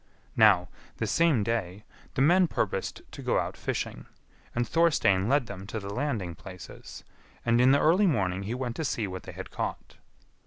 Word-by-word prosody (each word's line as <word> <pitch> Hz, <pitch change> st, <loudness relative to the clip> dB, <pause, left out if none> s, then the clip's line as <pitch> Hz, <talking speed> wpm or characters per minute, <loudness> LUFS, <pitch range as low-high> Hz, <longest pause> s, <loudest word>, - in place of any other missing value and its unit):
Now, 100 Hz, -6 st, +5 dB, 0.3 s
the -, -, -1 dB
same 165 Hz, -10 st, +3 dB
day, 100 Hz, -3 st, -2 dB, 0.3 s
the 135 Hz, -, +3 dB
men 175 Hz, +4 st, +5 dB
purposed 95 Hz, -9 st, -2 dB
to -, -, -9 dB
go -, -, +1 dB
out -, -, -2 dB
fishing, -, -, -4 dB, 0.5 s
and 120 Hz, 0 st, 0 dB
Thorstein 130 Hz, -, +3 dB
led 140 Hz, -1 st, +3 dB
them 100 Hz, -2 st, -8 dB
to 110 Hz, -, -4 dB
the 100 Hz, 0 st, -6 dB
landing 115 Hz, -, -2 dB
places, 90 Hz, +2 st, -11 dB, 0.4 s
and 120 Hz, 0 st, +4 dB
in 125 Hz, -, +6 dB
the 140 Hz, -, +5 dB
early 180 Hz, +7 st, +4 dB
morning 95 Hz, -, 0 dB
he 105 Hz, +5 st, -3 dB
went 125 Hz, -2 st, -3 dB
to 160 Hz, -, -2 dB
see 120 Hz, -6 st, -1 dB
what 95 Hz, -1 st, -6 dB
they -, -, -9 dB
had -, -, -8 dB
caught. -, -, -5 dB
115 Hz, 185 wpm, -28 LUFS, 95-140 Hz, 0.5 s, in